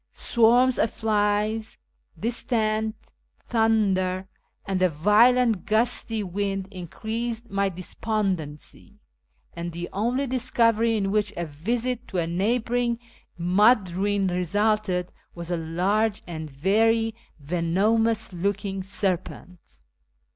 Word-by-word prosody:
Swarms 240 +2 +3
of 225 - +3
flies, 215 0 0 0.4
distant 220 -2 0 0.5
thunder, 195 -5 +1 0.4
and 190 -1 -1
a 185 - +4
violent 215 +6 +3
gusty 225 0 +1
wind 195 0 -2
increased 225 +6 -5
my 200 0 +1
despondency; 185 -4 -4 0.6
and 170 0 -5
the 175 +1 -5
only 240 +7 0
discovery 230 -3 +2
in 195 -2 -1
which 210 -1 +1
a 170 - -2
visit 235 +11 -3
to 185 - -5
a 170 - +1
neighbouring 235 +6 0 0.4
mud 190 +3 +4
ruin 200 +2 0
resulted 185 +1 0 0.2
was 170 0 -6
a 175 - 0
large 195 +7 0
and 160 -3 -6
very 225 +9 +2 0.3
venomous 190 +9 +1
looking 195 +2 -2
serpent. 185 -2 -4
205 Hz, 105 wpm, -25 LUFS, 180-225 Hz, 0.6 s, a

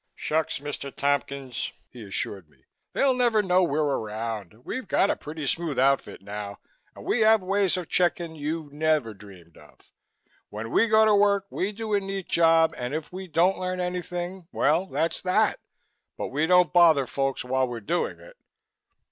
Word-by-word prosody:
"Shucks! 155 +1 -1
Mr. 140 -1 -5
Tompkins," 140 -3 -2 0.2
he 120 -3 -10
assured 95 -3 -4
me, 65 -3 -30 0.3
"they'll 270 -1 +3
never 240 -4 +2
know 185 -1 +3
we're 155 -3 +1
around. 110 - -4
We 260 - -3
got 200 -2 +2
a - - 0
pretty 150 0 -7
smooth 165 0 -1
outfit 135 -6 +1
now 100 0 -6 0.4
and - - -11
we 245 - +1
have 220 -2 +5
ways 195 -1 +1
of 180 -3 -5
checking 175 -2 0
you 155 +1 -4
never 150 -6 +1
dreamed 95 -5 -15
of. - - -20 0.6
When 110 +2 -6
we 230 - +4
go 220 0 +5
to 215 - +4
work, 200 -1 +3
we 195 +3 -1
do 215 0 -5
a 205 - +4
neat 195 -1 -5
job 165 -1 +4
and 125 +4 -3
if 160 +2 -5
we 190 +1 -6
don't 175 +4 +2
learn 185 0 -3
anything, 180 0 -4
well, 165 +6 +2
that's 165 -2 -1
that 185 0 +2 0.6
but - - -4
we 150 +4 0
don't 180 0 +4
bother 165 -6 +6
folks 135 0 -2
while 130 +1 +1
were 120 -1 -5
doing 170 +12 -2
it." - - -15
160 Hz, 175 wpm, -26 LUFS, 130-185 Hz, 0.6 s, bother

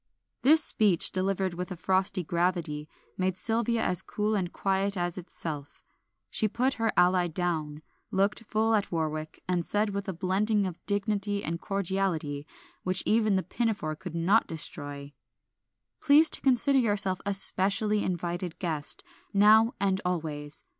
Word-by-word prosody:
This 310 +4 +5
speech, 205 - +3
delivered 190 0 -1
with 180 0 -6
frosty 190 +1 +1
gravity, 170 -3 -1 0.3
made 185 -1 0
Sylvia 230 +2 0
as 180 -1 +3
cool 210 +2 -2
and 185 -4 -1
quiet 195 0 0
as 175 -1 -2
itself. 160 -5 -7 0.5
She 215 - +1
put 255 +5 0
her 225 -1 +2
ally 180 0 +4
down, 160 -3 -3 0.3
looked 200 +4 0
full 220 +1 +1
at 205 -2 0
Warwick, 155 -2 -3
and 180 -1 0
said 210 +4 0
with 200 0 -4
a - - -2
blending 200 +4 +1
of 180 -3 -6
dignity 205 0 -1
and 170 +1 -3
cordiality 180 -7 -2 0.3
which 185 +1 +1
even 215 -2 +3
the 190 - 0
pinafore 205 -10 -2
could 180 0 -8
not 185 +7 +3
destroy 145 -2 -6 0.9
"Please 300 +3 +6
to - - +2
consider 270 +1 +3
yourself 205 -5 0
a 200 -1 -1
specially 205 +2 +2
invited 175 -1 -3
guest, 160 -5 -2 0.3
now 220 +3 +5
and 195 0 +1
always. 155 -4 -3
190 Hz, 145 wpm, -28 LUFS, 170-210 Hz, 0.9 s, Please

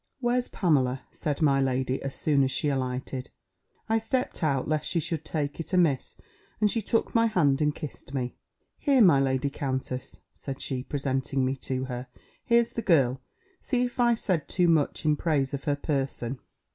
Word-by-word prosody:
"Where's 245 0 +1
Pamela?" 135 - +1
said 150 -1 -2
my 140 -2 +4
lady, 130 0 0
as 135 0 -4
soon 145 -3 +2
as 130 - +1
she 150 +3 0
alighted. 130 -1 -3 0.6
I 225 0 +2
stept 255 +3 -1
out, 140 -4 +1
lest 155 -1 -1
she 170 - +1
should 165 -1 -2
take 150 -2 -3
it 165 - -6
amiss: 165 -8 +2 0.4
and 210 -1 +3
she 230 - 0
took 225 +2 0
my 230 0 +4
hand, 155 -9 +2
and 150 -1 +2
kissed 150 -3 -8
me: 125 -3 -3 0.4
"Here, 275 -5 +4
my 165 -8 +6
lady 135 +1 +1
countess," 130 -1 -4 0.2
said 135 -1 -7
she, 130 -2 -3
presenting 135 0 -1
me 130 +1 0
to 130 0 -3
her, 125 0 -5 0.4
"here's 235 0 +3
the 230 - -3
girl; 135 - +3 0.4
see 250 -3 0
if 245 0 -4
I 240 -1 +4
said 180 -8 -1
too 180 -2 +2
much 160 -2 +2
in 150 -1 +3
praise 145 -5 0
of 140 +2 -4
her 145 -2 +2
person." 135 -3 -2
145 Hz, 185 wpm, -27 LUFS, 130-175 Hz, 0.6 s, my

